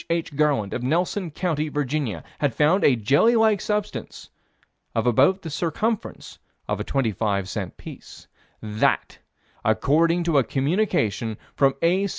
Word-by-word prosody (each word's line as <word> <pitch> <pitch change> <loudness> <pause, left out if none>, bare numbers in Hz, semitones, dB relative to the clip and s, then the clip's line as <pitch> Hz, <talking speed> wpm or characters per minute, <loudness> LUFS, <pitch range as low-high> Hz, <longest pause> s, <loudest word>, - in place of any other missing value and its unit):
H. 165 -3 -2
Garland, 140 -9 +1
of 125 - -3
Nelson 175 +7 0
County, 155 -1 -2
Virginia, 140 - -2 0.2
had 140 -6 0
found 160 +7 +3
a 135 - +5
jelly 140 - +3
like 220 -3 +3
substance 210 -1 -4 0.6
of 115 - 0
about 135 - +3
the 160 - -6
circumference 195 +8 -3 0.3
of - - -2
a - - -2
twenty 135 -5 0
five 100 -1 -1
cent 95 -2 -5
piece: - - -12 0.4
That, 105 0 0 0.4
according 165 +10 +2
to 165 -4 +3
a - - +2
communication 135 - 0 0.2
from 135 -1 +2
A. 185 +4 +3
150 Hz, 145 wpm, -23 LUFS, 120-175 Hz, 0.6 s, a